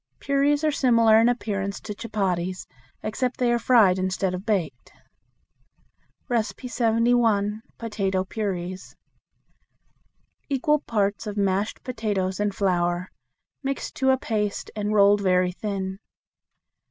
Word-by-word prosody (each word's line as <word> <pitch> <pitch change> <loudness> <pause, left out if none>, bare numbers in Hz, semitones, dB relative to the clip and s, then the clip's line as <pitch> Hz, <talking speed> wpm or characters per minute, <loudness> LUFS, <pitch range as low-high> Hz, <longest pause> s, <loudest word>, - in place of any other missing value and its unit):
Puris 285 +2 +1
are 310 - +3
similar 230 -5 +4
in 230 +1 +4
appearance 200 -5 -2
to 210 - -6
chupatties, 190 -5 -2 0.4
except 245 +3 -2
they 245 -1 +2
are 240 - +1
fried 220 -7 +4
instead 185 0 -1
of 185 +4 -6
baked. 175 - -2 1.5
71. 230 -3 +1 0.2
Potato 195 -4 -1
Puris. 185 -3 -5 1.5
Equal 295 +2 +2
parts 210 -5 -1
of 210 0 -5
mashed 200 +1 0
potatoes 205 -6 -2
and 205 -1 0
flour, 175 -2 0 0.5
mixed 275 -1 -3
to 265 0 +2
a 260 - +4
paste 210 -5 -2
and 210 -1 -2
rolled 205 -1 +5
very 180 -1 +2
thin. 190 0 -4
210 Hz, 115 wpm, -25 LUFS, 190-235 Hz, 1.5 s, rolled